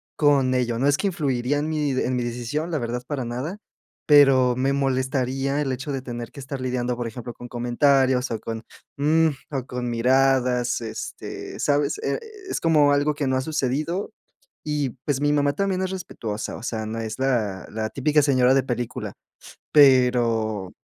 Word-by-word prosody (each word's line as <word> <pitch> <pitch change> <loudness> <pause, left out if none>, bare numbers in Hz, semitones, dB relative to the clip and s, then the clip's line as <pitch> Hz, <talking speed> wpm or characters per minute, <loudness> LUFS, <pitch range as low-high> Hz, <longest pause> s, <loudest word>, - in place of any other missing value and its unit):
con 140 -4 +3
ello, 120 -2 0
no 135 - +2
es 145 0 +3
que 205 - 0
influiría 140 -6 0
en 150 +2 -1
mi 150 -2 0
en 130 -1 0
mi 125 - -1
decisión, 120 +7 -3
la 160 - 0
verdad, 120 -1 -3
para 140 -4 -3
nada, 130 - -4 0.5
pero 135 -4 +6
me 135 +2 +1
molestaría 135 +1 0
el 135 -3 -1
hecho 130 +3 -4
de 135 -1 -3
tener 120 -2 -6
que - - -11
estar 135 0 -6
lidiando, 125 -1 -1
por 120 -1 -4
ejemplo, 120 +1 -7
con 120 - -10
comentarios 125 +1 +2
o 115 - -3
con, 115 0 -6 0.4
uh, 160 +2 +3 0.2
o 130 -2 -2
con 125 -1 -4
miradas. 125 0 +2
Este, 110 -1 -7
¿sabes?, 145 0 +1
es 435 -3 -4
como 150 -3 +4
algo 145 +1 +2
que 145 -1 -2
no 130 0 +1
ha - - 0
sucedido 155 +5 -2 0.5
y, 150 -3 -1
pues, 145 -3 0
mi 145 0 +2
mamá 145 -1 +2
también 190 +3 -1
es 185 - -1
respetuosa, 115 - -5
o - - -11
sea, 110 -2 -3
no 110 +1 -4
es 110 -1 -4
la 110 -9 0
la 110 0 -3
típica 150 +4 +2
señora 130 -3 +4
de 135 - +3
película, 120 -2 -4 0.6
pero, 120 -8 +4
130 Hz, 180 wpm, -24 LUFS, 120-145 Hz, 0.6 s, pero